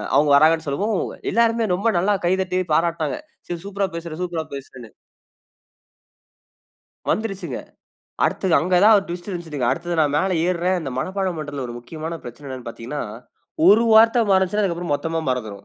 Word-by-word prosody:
அவுங்க 145 0 +4
வராங்கன்னு 160 +3 +4
சொல்லவும், 195 +8 0 0.3
எல்லாருமே 230 0 +2
ரொம்ப 200 +5 -1
நல்லா 195 +4 +2
கைதட்டி 185 0 +1
பாராட்னாங்க. 165 -1 +1 0.3
சரி 175 -1 -5
சூப்பரா 200 -1 -1
பேசுற! 170 -1 -6
சூப்பரா 170 -3 -2
பேசுறன்னு! 130 -4 -10 2.2
வந்துருச்சுங்க. 195 - -2 0.7
அடுத்தது 185 -3 +1
அங்க 180 +5 +1
தான் 220 +1 +8
ஒரு 195 - +1
ட்விஸ்ட் 175 +3 -7
இருஞ்சுதுங்க! 160 -8 -3
அடுத்தது 175 +1 -2
நான் 145 -2 +2
மேல 190 +5 +1
ஏறுறேன். 180 +1 +1
இந்த 135 - -5
மனப்பாடம் 190 -1 -2
பன்றத்துல 145 -3 -5
ஒரு 120 - -6
முக்கியமான 160 +6 -6
பிரச்சன 120 +4 -10
என்னன்னு 130 -2 -7
பார்த்தீங்கன்னா, 120 +6 -6 0.7
ஒரு 210 +5 +7
வார்த்த 225 +1 +6
மறந்துச்சுன்னா, 190 +2 +2
அதுக்கப்புறம் 170 -4 -1
மொத்தமா 165 +2 -2
மறந்துரும். 110 -6 -4
170 Hz, 145 wpm, -22 LUFS, 150-190 Hz, 2.2 s, தான்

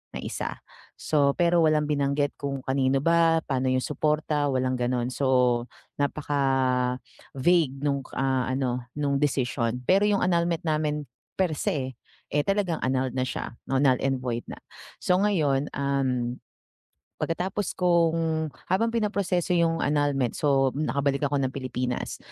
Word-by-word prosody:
na - - -4
1. - - -4 0.4
So 140 -2 +2
pero 175 -1 +3
walang 155 -1 +3
binanggit 145 0 +1
kung 140 -2 -3
kanino 135 0 +1
ba? 165 -1 +4
Paano 130 -2 -1
yung 130 0 +1
suporta? 150 -1 0
Walang 130 -1 0
ganon 125 0 0
so, 125 -3 +2 0.3
napaka-vague 135 +2 0
nung, 140 -1 +1 0.2
ah, 130 -1 +1
ano 125 -2 -1
nung 140 -2 +1
decision. 125 -4 0
Pero 195 +2 +4
yung 205 -1 +2
annulment 170 -2 +1
namin 150 -1 0 0.3
perse, 145 -7 -1 0.4
eh, 145 - +3
talagang 195 -5 0
annulled 130 -1 0
na - - +1
siya, - - -5 0.2
no 135 - +2
null 130 -3 +4
and 135 -1 +1
void 120 -2 -2
na. - - -7 0.4
So 180 - +3
ngayon, 150 -9 +1
um, 130 -3 -1 0.9
pagkatapos 185 +4 -2
kong 165 -3 +2 0.2
habang 210 +6 +2
pinaproseso 200 -5 0
yung 165 -1 +2
annulment, 145 -4 +1
so 135 -2 +3
nakabalik 140 -1 0
ako 145 0 0
ng 130 -1 -1
Pilipinas, 125 -2 -3
140 Hz, 135 wpm, -26 LUFS, 130-165 Hz, 0.9 s, ba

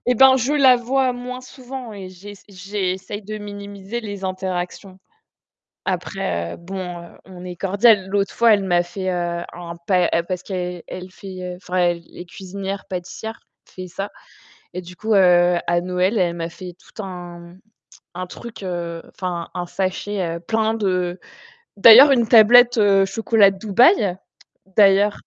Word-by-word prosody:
et 250 - +3
ben, 265 +2 +7
je 260 +3 0
la 265 -4 +6
vois 255 +1 0
moins 250 +1 -7
souvent 255 -2 -9
et 195 -2 -8
j'ess 195 +2 -12
j'essaye 195 +1 -4
de 215 +2 -6
minimiser 205 +1 -7
les 205 -3 -7
interactions. 185 0 -5 0.9
Après, 85 0 -3
heu, - - -10
bon, 180 0 -7
heu, 170 - -15
on 180 -1 -12
est 180 -1 -7
cordial. 200 +1 +3
L'autre 200 0 -1
fois, 235 -1 +5
elle 200 - -1
m'a 175 -2 +2
fait, 185 +2 -4
heu, 175 -1 -2
un 170 -1 -8
pa 180 -3 +3 0.2
parce 185 0 -3
qu'elle 180 -2 -5
elle 185 0 -8
fait, 185 -2 -8
enfin, 180 0 -6
elle 175 -1 -1
est 175 - -7
cuisinière-pâtissière, 195 +3 -7 0.3
fait 185 0 -9
ça. 195 +4 -5 0.6
Et 180 - -5
du 180 +1 -12
coup, 215 +5 -1
heu, 180 -2 +5
à 175 0 +2
Noël, 185 +4 0
elle 175 -3 +1
m'a 165 0 -4
fait 180 +1 -10
tout 215 - -10
un 175 -2 -9 0.6
un 185 +1 -5
truc, 225 +3 -10
enfin, 175 0 -5
un 180 -1 -4
sachet, 190 +2 -3
heu, 170 - -8
plein 220 +4 0
de 185 -4 -1 0.6
d'ailleurs, 235 +7 +9
une 240 -4 +3
tablette 240 +1 +7 0.3
chocolat 210 +1 +3
de 195 - -10
Dubaï, 215 - +3 0.6
d'ailleurs. 205 0 +4
190 Hz, 155 wpm, -21 LUFS, 180-215 Hz, 0.9 s, d'ailleurs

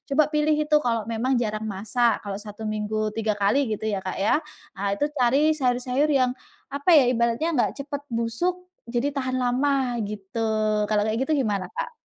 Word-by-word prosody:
Coba 305 - +6
pilih 300 0 +2
itu, 300 0 +1
kalau 230 -5 0
memang 230 +4 -1
jarang 220 -2 -1
masak. 215 +4 0
Kalau 200 -1 -5
1 210 +1 -9
minggu 215 0 -2
3 220 -1 -1
kali 210 +7 +2
gitu 210 - -11
ya, 210 -3 -1
Kak, 185 0 -5
ya. 200 +9 +2 0.3
Ah, 200 0 -2
itu 200 - -2 0.2
cari 275 +6 +4
sayur-sayur 255 -1 +1
yang 265 -4 +3 0.4
apa 280 +5 -1
ya, 290 - +7
ibaratnya 235 +5 +1
nggak 265 -7 +1
cepet 285 0 -5
busuk, 235 +9 -1 0.3
jadi 245 +4 -1
tahan 260 -2 -2
lama 255 0 +1
gitu. 210 +2 -4 0.4
Kalau 210 -1 +2
kayak 220 +2 -1
gitu 310 - +2
gimana, 205 -4 -1
Kak? 485 0 -4
240 Hz, 180 wpm, -25 LUFS, 215-280 Hz, 0.4 s, ya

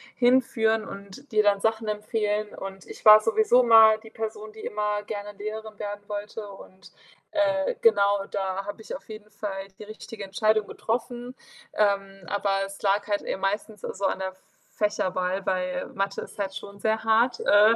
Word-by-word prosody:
hinführen 230 -3 +3
und 200 +7 -11
dir 215 0 +4
dann 200 -1 +3
Sachen 220 0 0
empfehlen. 210 0 -1
Und 195 -1 -8
ich - - -11
war 215 0 +10
sowieso 225 +3 +4
mal 220 -2 +8
die 220 0 -14
Person, 215 -1 -5
die 220 - -11
immer 210 0 -1
gerne 205 -1 -6
Lehrerin 215 0 -6
werden 205 0 -6
wollte. 210 +1 -5
Und, 195 -1 -14 0.4
äh, 300 +7 +1
genau, 200 - +4
da 195 0 -3
habe 205 +2 -7
ich - - -6
auf - - -12
jeden 215 -1 -10
Fall 195 -2 -5
die - - -7
richtige 215 0 -9
Entscheidung 215 +2 +1
getroffen. 245 +2 -4 0.4
Ähm, 195 -2 0
aber 195 -1 0
es 195 0 -10
lag 200 +1 +2
halt 205 -1 0
eher - - -3
meistens 205 +1 -2
so 200 - -4
an 190 - 0
der 190 - -2
F 190 - -18 0.4
Fächerwahl, 190 -2 -1
weil 185 -1 -1
Mathe 195 0 -2
ist - - -11
halt 195 -1 -2
schon 200 0 -9
sehr 220 +1 0
hart, 225 +3 +3
äh, 210 +2 +6
210 Hz, 175 wpm, -26 LUFS, 195-220 Hz, 0.4 s, war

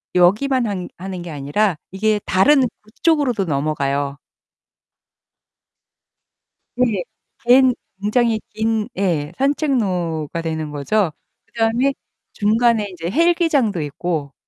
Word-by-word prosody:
여기만 230 +8 +3
한 185 -3 -3
하는 185 0 -6
게 175 - -7
아니라 150 +6 0
이게 210 +2 +1
다른 270 +9 +4 0.2
북쪽으로도 250 - +1
넘어가요. 140 -2 -1 2.6
네. 225 -8 +1 0.4
갠 255 +1 +6 0.3
굉장히 225 +1 +2
긴 220 0 0
예 165 -6 0
산책로가 185 - 0
되는 160 -2 -3
거죠. 160 +6 0 0.4
그다음에 235 +4 +1 0.4
중간에 220 0 +2
이제 170 -1 -5
헬기장도 310 - +2
있고. 145 -1 -3
205 Hz, 220 characters per minute, -20 LUFS, 165-240 Hz, 2.6 s, 갠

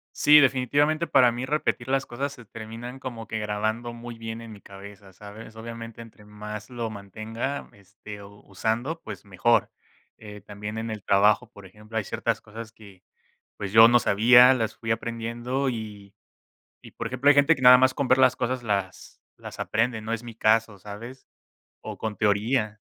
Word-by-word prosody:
Sí, 150 0 +7
definitivamente 145 +5 +1
para 125 -2 +5
mí 120 +2 -4
repetir 130 -3 -1
las 135 0 0
cosas 140 +4 -4
se 125 - -13
terminan 115 +4 -9
como 115 -4 -7
que 110 - -3
grabando 110 +3 -3
muy 120 0 -9
bien 115 0 -7
en 115 -1 -10
mi 105 - -11
cabeza, 100 0 -13
¿sabes? 105 +3 -12
Obviamente 115 0 -9
entre 110 -2 -15
más 105 0 -8
lo 120 -2 -4
mantenga, 110 +6 -6
este, 100 +1 -12
o 100 +1 -14
usando, 115 - -2
pues, - - -9
mejor. 100 +4 +1 0.5
Eh, 105 -1 -11
también 105 +2 -8
en 115 0 -4
el 105 -1 -6
trabajo, 105 +4 +3
por 100 -4 -15
ejemplo, 105 +4 -9
hay 110 - 0
ciertas 115 +1 -2
cosas 110 +1 -10
que, 100 -5 -17 0.5
pues, 100 -2 -6
yo 110 +1 +9
no 120 - +5
sabía, 120 +4 +6
las 115 -4 -2
fui 115 - -6
aprendiendo 115 +4 -3
y 105 -4 -7 0.7
y - - -14
por - - -5
ejemplo, 130 +3 -2
hay 145 - +7
gente 145 +3 +5
que - - -9
nada 125 0 +9
más 130 0 +3
con 140 -1 -2
ver 130 - +4
las 130 -1 +4
cosas 125 0 -2
las 100 -3 -4 0.2
las - - -11
aprende, 115 +1 -1
no 110 +1 -4
es 115 - -4
mi 120 -1 -9
caso, 110 -2 +1
¿sabes? 110 +7 -10 0.6
O - - -8
con 110 -2 -4
teoría 105 +2 0
115 Hz, 185 wpm, -25 LUFS, 105-125 Hz, 0.7 s, yo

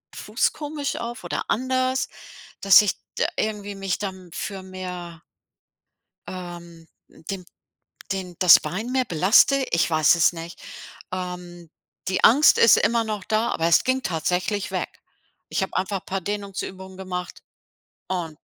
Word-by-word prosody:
Fuß - - 0
komisch 295 -1 -4
auf 235 +1 -6
oder - - -2
anders, 255 +2 0 0.5
dass 195 +1 +8
ich 205 - 0 0.2
d - - +3
irgendwie 205 -2 -3
mich 195 -2 -2
dann 190 -3 -6
für 195 0 -5
mehr 180 -3 -8 1.1
ähm, 170 -2 -9 0.2
den 185 +2 -8 0.7
den 185 -2 -5
das 180 -3 +9
Bein 220 +7 -5
mehr 260 0 +1
belaste. 220 - +4
Ich 170 - +2
weiß 155 0 +4
es 170 +1 +4
nicht. 165 +1 -9 0.5
Ähm, 180 -2 -6 0.4
die 185 0 -1
Angst 285 +6 +7
ist 230 - +7
immer 235 0 +2
noch 215 -4 -4
da, 220 +2 0
aber 165 - 0
es 170 - +5
ging 260 0 0
tatsächlich 180 +4 -1
weg. - - -4 0.5
Ich - - -1
habe 190 - -3
einfach 190 0 -2
paar 195 0 -2
Dehnungsübungen 190 -1 -5
gemacht 180 -2 -6 0.7
und 170 -5 -4
190 Hz, 140 wpm, -24 LUFS, 175-215 Hz, 1.1 s, das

